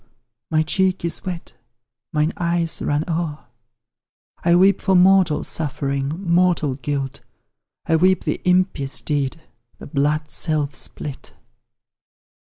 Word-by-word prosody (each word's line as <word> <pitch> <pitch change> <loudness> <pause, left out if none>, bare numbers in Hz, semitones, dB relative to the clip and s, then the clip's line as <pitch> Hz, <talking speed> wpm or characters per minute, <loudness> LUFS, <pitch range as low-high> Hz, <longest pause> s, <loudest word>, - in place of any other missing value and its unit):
my 155 -1 +2
cheek 185 +2 0
is 170 - -3
wet 180 -3 -6 0.6
mine 150 +2 +1
eyes 170 -1 0
run 145 +1 0
o'er; 160 -4 -3 1.0
I 170 0 +4
weep 190 +3 +4
for 190 -1 +2
mortal 185 -3 +4
suffering, 140 +2 -2
mortal 170 -4 +2
guilt, 135 +1 -3 0.7
I 165 -1 +3
weep 185 +3 +3
the - - -2
impious 180 -7 +1
deed, 145 0 -1 0.4
the - - -10
blood 150 +2 -1
self 150 -3 -1
spilt. 140 0 -7
160 Hz, 115 wpm, -21 LUFS, 145-180 Hz, 1.0 s, I